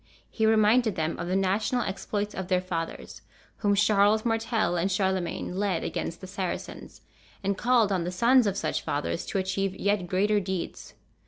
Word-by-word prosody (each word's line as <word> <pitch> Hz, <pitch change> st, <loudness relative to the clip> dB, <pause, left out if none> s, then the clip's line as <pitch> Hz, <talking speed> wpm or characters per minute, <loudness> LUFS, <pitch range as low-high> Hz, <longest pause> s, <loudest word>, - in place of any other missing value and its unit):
He 220 Hz, -1 st, +1 dB
reminded 220 Hz, 0 st, +4 dB
them 160 Hz, 0 st, -2 dB
of 170 Hz, -, -3 dB
the 185 Hz, -, 0 dB
national 205 Hz, +6 st, +1 dB
exploits 205 Hz, +1 st, -3 dB
of 190 Hz, -1 st, -5 dB
their 185 Hz, -1 st, +2 dB
fathers, 170 Hz, -3 st, -5 dB, 0.4 s
whom 205 Hz, -1 st, +2 dB
Charles 210 Hz, +1 st, +3 dB
Martel 225 Hz, -4 st, 0 dB
and 180 Hz, +3 st, 0 dB
Charlemagne 190 Hz, -2 st, -1 dB
led 195 Hz, -3 st, 0 dB
against 165 Hz, -, -4 dB
the -, -, -7 dB
Saracens, 185 Hz, -1 st, -6 dB, 0.4 s
and 200 Hz, 0 st, 0 dB
called 235 Hz, -1 st, +3 dB
on 185 Hz, -3 st, 0 dB
the 175 Hz, -, -3 dB
sons 235 Hz, +5 st, +4 dB
of 200 Hz, -1 st, -1 dB
such 155 Hz, -, -1 dB
fathers 145 Hz, +3 st, -3 dB
to -, -, -2 dB
achieve 190 Hz, 0 st, -1 dB
yet 200 Hz, -2 st, 0 dB
greater 205 Hz, +3 st, +2 dB
deeds. 190 Hz, -2 st, -5 dB
195 Hz, 170 wpm, -27 LUFS, 185-215 Hz, 0.4 s, reminded